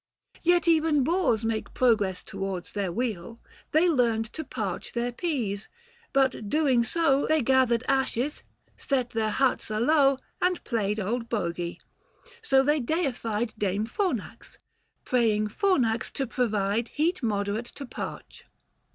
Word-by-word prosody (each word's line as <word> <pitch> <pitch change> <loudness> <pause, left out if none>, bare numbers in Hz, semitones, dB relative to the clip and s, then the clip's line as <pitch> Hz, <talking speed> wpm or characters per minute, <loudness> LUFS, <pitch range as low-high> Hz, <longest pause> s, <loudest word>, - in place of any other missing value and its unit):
Yet 350 0 +3
even 315 -3 +4
boors 280 - +1
make 225 -1 -3
progress 210 -7 +2
towards 190 -2 -5
their 200 -3 -1
weal, 225 0 -3 0.3
They 320 +4 +4
learned 235 -8 +2
to 315 - -4
parch - - -4
their 240 +1 -1
pease; 235 - -3 0.4
but 265 -6 +1
doing 275 -5 +3
so 285 +1 +2
They 310 -3 +2
gathered 255 -2 +3
ashes, 270 +1 0 0.3
set 255 -4 -1
their 220 -1 0
huts 260 +2 +1
alowe, 275 +5 +3 0.2
555 - - +4
And 365 -1 -3
played 215 -3 -1
old 230 +4 -2
bogy. 175 -5 -2 0.6
So 270 -11 +4
they 295 +2 +2
deified 240 -6 -1
Dame 205 +1 0
Fornax; 255 - -3 0.5
praying 215 -4 +2
Fornax 240 - +1
to 270 - -1
provide 225 -2 0
Heat 335 +5 0
moderate 210 0 -1
to 280 - -7
parch. - - -8
240 Hz, 135 wpm, -27 LUFS, 215-285 Hz, 0.6 s, even